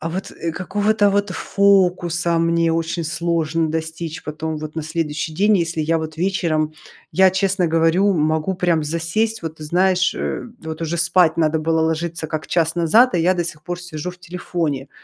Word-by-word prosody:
А 165 Hz, -, -3 dB
вот, 185 Hz, +4 st, -5 dB
э, 165 Hz, -, -4 dB
какого-то, 205 Hz, +4 st, +1 dB
вот, 205 Hz, 0 st, +1 dB
фокуса 180 Hz, -3 st, +2 dB
мне 165 Hz, 0 st, +2 dB
очень 165 Hz, +1 st, -2 dB
сложно 165 Hz, 0 st, 0 dB
достичь 160 Hz, 0 st, -4 dB
потом, 155 Hz, +1 st, -4 dB
вот 155 Hz, 0 st, -7 dB
на 160 Hz, -, -2 dB
следующий 155 Hz, 0 st, -3 dB
день, 205 Hz, +3 st, +3 dB
если 165 Hz, -1 st, -1 dB
я 165 Hz, +2 st, +1 dB
вот 160 Hz, 0 st, -6 dB
вечером, 165 Hz, -4 st, 0 dB, 0.4 s
я 190 Hz, 0 st, +5 dB
честно 190 Hz, -1 st, +1 dB
говорю, 165 Hz, +5 st, +3 dB
могу 155 Hz, +3 st, 0 dB
прям 175 Hz, -3 st, +1 dB
засесть. 170 Hz, +8 st, -1 dB
Вот 160 Hz, -1 st, -5 dB
знаешь, 185 Hz, +4 st, +2 dB
э, -, -, -3 dB, 0.2 s
вот 160 Hz, 0 st, -6 dB
уже 165 Hz, +1 st, -2 dB
спать 170 Hz, -1 st, +3 dB
надо 160 Hz, -1 st, +2 dB
было 160 Hz, +1 st, +1 dB
ложиться 160 Hz, 0 st, -2 dB
как 155 Hz, 0 st, -4 dB
час 165 Hz, -1 st, 0 dB
назад, 195 Hz, +10 st, +5 dB
а -, -, +2 dB
я 180 Hz, +3 st, +3 dB
до 175 Hz, -, -1 dB
сих 155 Hz, -2 st, -7 dB
пор 175 Hz, +2 st, -5 dB
сижу 175 Hz, -1 st, -6 dB
в 180 Hz, -, -14 dB
телефоне. 170 Hz, -6 st, -3 dB
165 Hz, 180 wpm, -20 LUFS, 160-180 Hz, 0.4 s, я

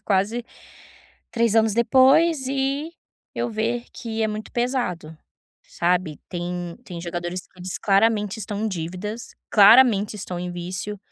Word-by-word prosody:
quase 215 Hz, +3 st, 0 dB, 0.9 s
3 230 Hz, -2 st, +1 dB
anos 220 Hz, -1 st, +4 dB
depois 265 Hz, +5 st, +4 dB
e 275 Hz, +3 st, -1 dB, 0.4 s
eu 240 Hz, -, -1 dB
ver 230 Hz, +2 st, -2 dB
que 225 Hz, -1 st, -4 dB
é 220 Hz, -, +1 dB
muito 215 Hz, 0 st, -6 dB
pesado, 240 Hz, -, -2 dB, 0.5 s
sabe. 175 Hz, -3 st, -1 dB
Tem 175 Hz, 0 st, -5 dB
tem 175 Hz, -3 st, -7 dB
jogadores 175 Hz, +1 st, -4 dB
que 185 Hz, -, -23 dB
eles 180 Hz, 0 st, -5 dB
claramente 210 Hz, +1 st, +2 dB
estão 205 Hz, 0 st, -4 dB
em 220 Hz, -, 0 dB
dívidas, 185 Hz, +6 st, -6 dB, 0.2 s
claramente 210 Hz, -1 st, +6 dB
estão 180 Hz, -3 st, -6 dB
em 180 Hz, 0 st, -4 dB
vício 180 Hz, +4 st, -5 dB
210 Hz, 135 wpm, -23 LUFS, 180-235 Hz, 0.9 s, claramente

